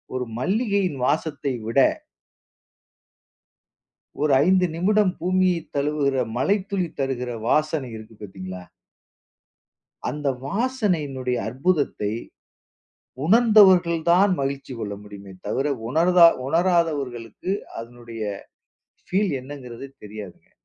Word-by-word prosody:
ஒரு 125 -1 -2
மல்லிகையின் 195 - 0
வாசத்தை 145 -1 -1
விட 115 +4 -3 2.5
ஒரு 150 - +3
5 185 -1 +4
நிமிடம் 195 +2 +2
பூமியை 185 -1 +2
தழுவுற 140 -3 +1
மழைத்துளி 195 +4 0
தருகிற 130 -2 -2 0.2
வாசனை 155 -4 +1
இருக்கு 110 +1 -12
பாத்தீங்களா? 95 -2 -8 1.5
அந்த 145 -1 -2 0.2
வாசனையினுடைய 165 - -1
அற்புதத்தை, 135 - 0 1.1
உணர்ந்தவர்கள் 190 -5 +6
தான் 195 +3 +5
மகிழ்ச்சி 135 0 -3
கொள்ள 105 -2 -4
முடியுமே 100 -2 -11
தவிர, 130 +6 -1 0.2
உணர்தா 170 +4 +6 0.2
உணராதவர்களுக்கு 160 -4 0 0.3
அதனுடைய, 115 -1 -8 0.8
ஃபீல் 195 +1 +1
என்னங்கிறதே 130 -1 -9 0.2
தெரியாதுங்க. 105 -3 -10
145 Hz, 85 wpm, -23 LUFS, 125-185 Hz, 2.5 s, உணர்ந்தவர்கள்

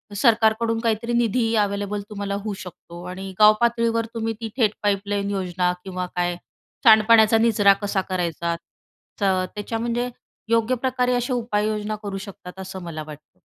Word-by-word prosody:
सरकारकडून 225 0 +3
काहीतरी 230 +1 -1
निधी 235 -1 +1
अव्हेलेबल 205 0 0
तुम्हाला 200 -1 -3
होऊ 215 - -3
शकतो 175 -1 -11
आणि 190 +1 -6
गावपातळीवर 230 +1 +4
तुम्ही 225 -1 -2
ती 225 - -3
थेट 215 -4 +3
पाईपलाईन 200 0 0
योजना 180 -2 0
किंवा 185 -1 -4
काय, 175 0 0 0.5
सांडपाण्याचा 220 -1 +6
निचरा 215 -3 +5
कसा 200 -1 0
करायचा, 170 -2 -1 0.7
तर 190 -2 +2
त्याच्या 215 +2 -3
म्हणजे 240 +1 -1 0.4
योग्य 230 +2 +3
प्रकारे 250 0 0
अशा 245 +1 -1
उपाययोजना 215 -2 -1
करू 200 -1 -4
शकतात 190 -1 -10
असं 190 0 -7
मला 165 -2 -6
वाटतं. 150 0 -13
210 Hz, 140 wpm, -23 LUFS, 190-230 Hz, 0.7 s, सांडपाण्याचा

